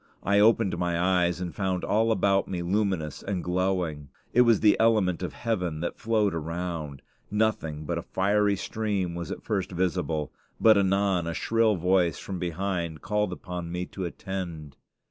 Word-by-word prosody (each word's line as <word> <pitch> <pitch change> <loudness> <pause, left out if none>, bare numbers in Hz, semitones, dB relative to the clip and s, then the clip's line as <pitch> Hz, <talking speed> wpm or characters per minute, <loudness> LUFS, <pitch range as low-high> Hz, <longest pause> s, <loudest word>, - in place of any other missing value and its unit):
I 100 +1 +3
opened 105 -4 +3
my 85 -1 0
eyes 90 -1 +2
and 90 -3 -4
found 95 -1 -1
all 110 +2 +2
about 100 -2 +2
me 90 -2 -3
luminous 95 -5 -1
and 95 -3 -3
glowing. 90 -5 -1 0.2
It 125 - +6
was 115 -4 +5
the 105 -1 +6
element 110 -6 +3
of 90 - -4
heaven 90 -9 -2
that 85 - -4
flowed 110 -4 +1
around. 80 -3 -4 0.3
Nothing 100 -8 -1
but - - -2
a - - -11
fiery 100 +1 +2
stream 100 -3 -2
was 85 -2 -5
at - - -6
first 100 -4 -2
visible; 85 -4 -1 0.3
but 110 -1 +7
anon 95 -3 +2
a 85 - -3
shrill 115 -2 +2
voice 90 -2 +2
from 95 -2 -6
behind 85 -3 -3
called 105 -2 0
upon 90 -1 -6
me 90 +1 -2
to 95 0 -6
attend. 85 -5 -6
90 Hz, 165 wpm, -27 LUFS, 85-100 Hz, 0.3 s, but